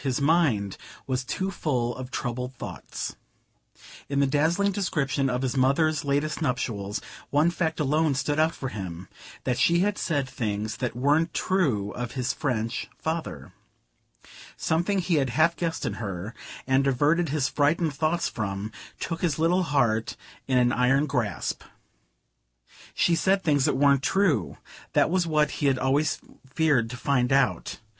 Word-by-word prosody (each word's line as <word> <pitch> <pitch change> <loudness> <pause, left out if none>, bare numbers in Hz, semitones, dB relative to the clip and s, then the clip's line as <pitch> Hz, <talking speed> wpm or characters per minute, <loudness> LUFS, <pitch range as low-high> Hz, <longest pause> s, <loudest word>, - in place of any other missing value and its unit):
His 130 -3 -1
mind 140 - +2 0.3
was 130 -1 -1
too 190 +8 -2
full 125 -9 -1
of 130 -1 -7
troubled 125 0 -4
thoughts. - - -6 0.9
In 140 0 0
the 140 - +4
dazzling 160 +8 +2
description 145 -8 0
of 125 +1 -1
his 130 -2 -1
mother's 140 +4 +2
latest 145 +3 -1
nuptials 110 -7 -2 0.3
one 150 +4 +3
fact 165 -2 -1
alone 150 0 +2
stood 145 +2 0
out 160 +1 +2
for 130 - -4
him 95 -4 -7 0.3
that 125 -2 -1
she 170 +1 +4
had 205 +1 0
said 145 -5 0
things 110 -4 -3
that 125 -2 -3
weren't 150 +6 +2
true 130 - +1
of 120 -1 -5
his 130 -2 -1
French 115 -4 -2
father. 160 +1 -4 1.0
Something 175 +5 0
he 175 -3 +1
had 135 -3 +1
half 160 +6 +3
guessed 165 -1 -2
in - - -1
her, 100 +1 -5 0.3
and 135 +1 +2
averted 150 +5 +2
his 140 -2 +1
frightened 155 +2 +1
thoughts 160 +4 0
from, 100 -2 -4 0.3
took 165 -1 -4
his 165 -6 +1
little 170 +3 +3
heart 115 -8 +1 0.3
in 130 -1 +2
an 120 -1 +4
iron 135 +4 +3
grasp. 125 -8 -2 1.3
She 175 - +3
said 190 +3 +2
things 145 -4 +3
that - - +1
weren't 140 -1 +4
true.... 190 +1 +1 0.4
That - - +3
was 180 -2 +1
what 150 -2 +2
he 145 - +3
had 135 -1 +3
always 140 +4 +1 0.3
feared 135 -5 +2
to 125 - -6
find 125 -1 +1
out.... 135 -1 +1
140 Hz, 155 wpm, -26 LUFS, 125-160 Hz, 1.3 s, the